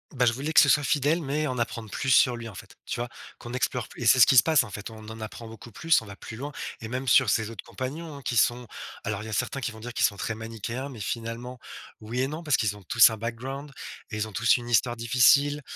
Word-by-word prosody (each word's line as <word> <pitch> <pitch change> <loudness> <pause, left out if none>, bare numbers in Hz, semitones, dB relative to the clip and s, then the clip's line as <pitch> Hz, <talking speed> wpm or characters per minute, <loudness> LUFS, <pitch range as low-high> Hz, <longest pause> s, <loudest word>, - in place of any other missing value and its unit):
Bah, 125 - +3
je 115 - +4
voulais 140 +6 -4
que - - +8
ce - - +4
soit 145 - +4
fidèle, 145 +5 +1
mais 150 +2 -1
en 130 -2 -3
apprendre 115 -2 -3
plus 135 - -2
sur 125 -1 +5
lui 115 - -7
en 105 - -10
fait. - - -12
Tu 120 - -3
vois? 120 - -4 0.3
Qu'on 120 - -9
explore 125 0 -2
plu - - -12
et - - -3
c'est 125 +3 +6
ce - - +10
qui 130 - +4
se - - +9
passe, 155 -6 +4
en 115 - -9
fait. 105 +2 -7
On 110 -1 -11
en 110 0 -8
apprend 110 +1 -8
beaucoup 115 +1 -11
plus, 165 +2 +2
on - - -12
va 100 -1 -10
plus 110 - -9
loin 145 +2 -6 0.3
et 110 - -7
même 125 +2 -3
sur 125 -1 +5
ses 110 0 +1
autres 115 - -8
compagnons, 150 +4 -6
hein, 140 - -10
qui 120 -2 -2
sont 120 +2 +2 0.4
alors 105 -1 -3
il - - -8
y 110 - -7
a - - -5
certains 130 +4 -1
qui 120 -2 -3
vont 110 - -12
dire 120 +1 -6
qu'ils - - +2
sont 100 - 0
très 115 - -3
manichéens. 115 +4 -5
Mais 120 -7 -9
finalement 115 +3 -5 0.4
oui, 115 +4 -3
et 135 - +1
non 155 +3 -6
parce 145 -6 +2
qu'ils 105 -2 -1
ont 100 - -15
tous 120 +6 +6
un 110 - -5
background 130 +6 -6 0.4
et 105 - -4
ils 110 0 -2
ont - - -12
tous 115 +3 +3
une 120 -1 -5
histoire 120 +1 +2
difficile. 140 +5 +4
120 Hz, 290 wpm, -26 LUFS, 110-135 Hz, 0.4 s, ce